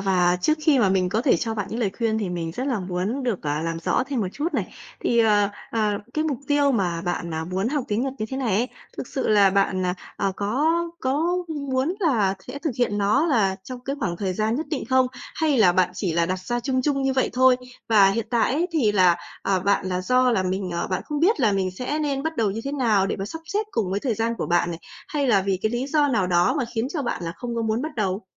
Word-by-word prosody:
và 180 -2 +2
trước 310 0 +2
khi 305 -4 +4
mà 205 - +4
mình 185 -1 +2
có 215 +5 0
thể 265 - +4
cho 225 -1 -2
bạn 205 -3 -3
những 230 - -3
lời 205 -5 +1
khuyên 225 -2 +1
thì 205 -4 -2
mình 170 -2 -3
rất 255 +9 -3
là 250 -7 0
muốn 185 +8 -2
được, 240 -7 -2
à, 150 0 -1
làm 165 0 -2
rõ 165 - +1
thêm 270 -4 -2
một 190 - -1
chút 310 +3 -3
này - - -2 0.3
thì, 235 - +1
ờ, 210 -3 +4 0.2
ờ, 215 -2 +1 0.2
cái 310 - 0
mục 290 -6 -1
tiêu 285 -1 +3
mà 180 -7 0
bạn, 170 -2 -3
à, 160 - -2
muốn 185 +5 -1
học 280 -2 -1
tiếng 210 +3 0
Nhật 270 -1 -2
như 215 - -2
thế 265 - -3
này 245 -7 0
ấy, 240 +3 +1 0.3
thực - - -5
sự 265 - -2
là 205 -2 +5
bạn, 190 -1 +1
à, 180 - 0 0.2
à, 195 -1 0
có 255 +11 +1 0.3
có 310 +7 +1
muốn 280 +1 -1
là 220 - +2
sẽ 250 +3 -6
thực 300 +1 -2
hiện 210 -4 +1
nó 215 +11 +2
là 200 - +2
trong 250 +3 -7
cái 275 +1 -3
khoảng 175 -7 -1
thời 190 0 -2
gian 220 +3 0
nhất 315 - -3
định 290 - -2
không? 260 +1 +3 0.3
Hay 305 -5 +1
là 185 -5 +6
bạn 180 0 +2
chỉ 185 -4 -2
là 170 0 +2
đặt 185 +1 -1
ra 240 +7 -3
chung 255 +1 0
chung 275 0 0
như 270 0 +1
vậy 260 - +1
thôi? 255 +1 +5 0.3
Và 205 -4 +6
hiện 225 +2 -2
tại 235 0 +2
ấy 325 +6 +1
thì 250 -10 +2
là, 180 -4 +5 0.3
ờ, 190 -2 +1
bạn 200 0 +1
là 180 -1 -1
do 255 +6 +3
là 200 -6 +2
mình, 185 0 -2
ờ, 170 - -2
bạn 185 - -2
không 295 0 -3
biết 355 -3 +3
là 220 -4 +3
mình 190 -2 0
sẽ 250 +10 -3
nên 280 -3 -1
bắt 320 +1 -3
đầu 220 -3 +1
như 215 +3 -4
thế 275 - -3
nào 220 -8 +2
để - - -2
mà 195 - -4
sắp 320 +11 -7
xếp 410 +6 -2
cùng 210 - -1
với 200 - -1
thời 240 -1 -1
gian 225 +2 -1
của - - -2
bạn 175 0 +2
này, 165 - -5 0.3
hay 295 -7 0
là 200 -6 +4
vì 195 -1 0
cái 215 - +1
lý 245 +2 -1
do 290 0 +2
nào 210 -9 +1
đó 175 +6 +3
mà 265 - 0
khiến 230 +2 -1
cho 300 - -1
bạn 240 - -1
là 165 - -3
không 240 -2 -5
có 230 - 0
muốn 220 +2 0
bắt 310 0 -5
đầu? 195 -1 -1
225 Hz, 275 wpm, -24 LUFS, 190-270 Hz, 0.3 s, là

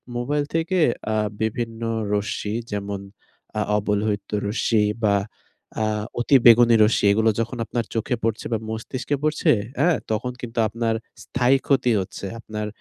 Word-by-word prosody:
Mobile 145 +5 0
থেকে 165 +3 +1 0.4
আ - - +1 0.3
বিভিন্ন 115 +1 -2 0.3
রশ্মি 105 0 -2 0.2
যেমন 100 -1 -3 0.6
আ - - +1 0.2
অবলহিত 105 0 -1 0.2
রশ্মি 110 0 +1 0.2
বা, 100 -1 +4 0.7
আ - - +2 0.4
অতি 120 +4 +3
বেগুনি 120 0 +8
রশ্মি, 105 - +1
এগুলো 110 +2 +3
যখন 115 +2 -2
আপনার 115 0 -2
চোখে 115 +3 0
পড়ছে 115 -1 -1
বা, - - +2
মস্তিষ্কে 120 +5 -3
পড়ছে, 155 0 +2 0.3
আ? - - +4 0.2
তখন 110 +4 -1
কিন্তু 120 -1 -4
আপনার 115 +1 -1 0.3
স্থায়ী 125 +2 +2
ক্ষতি 130 -3 +3
হচ্ছে। 95 - -7
আপনার 105 -2 -5
115 Hz, 140 wpm, -23 LUFS, 105-125 Hz, 0.7 s, বেগুনি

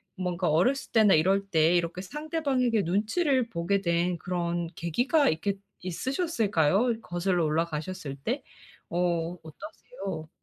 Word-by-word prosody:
뭔가 180 -2 -1
어렸을 245 - +1
때나 215 -3 +5
이럴 195 +5 +3
때 160 0 +4
이렇게 175 +1 -1
상대방에게 275 - 0
눈치를 230 - +1
보게 185 +3 0
된 170 0 +1
그런 175 -1 -2
계기가 245 - +2
있겠 195 +5 -1 0.2
있으셨을까요? 205 - 0
어 235 +2 +2
거슬러 175 -2 0
올라가셨을 155 -1 -2
때? 240 - -3 0.5
어 175 0 0
어떠세요? 190 -1 -8
185 Hz, 300 characters per minute, -28 LUFS, 170-225 Hz, 0.5 s, 때나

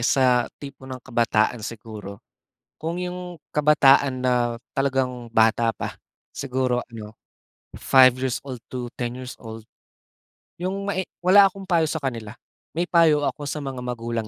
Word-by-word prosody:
sa 125 -1 +3
tipo 140 -2 -11
ng 130 -1 -7
kabataan 115 0 +1
siguro. 105 -2 -8 0.5
Kung 165 +3 -4
yung 180 -1 -6 0.2
kabataan 140 -3 +4
na 125 - +2 0.4
talagang 130 -3 -1
bata 115 +1 +3
pa, - - -6 0.4
siguro 130 -2 -1
ano, 110 -1 -9 0.6
five 130 -2 +6
years 130 -2 -1
old 130 -3 -7
to 125 -1 -5
ten 120 -1 -2
years 125 0 -7
old. 110 -1 -9 1.0
Yung 195 +2 -3
mae 190 -2 -1 0.2
wala 195 +2 +6
akong 195 0 -11
payo 170 -3 +3
sa 160 - -2
kanila. 115 -6 -4 0.4
May 175 +2 -1
payo 155 -4 +4
ako 150 - -4
sa 145 +2 -3
mga 135 -3 -5
magulang 115 -2 -3
130 Hz, 145 wpm, -24 LUFS, 120-150 Hz, 1.0 s, five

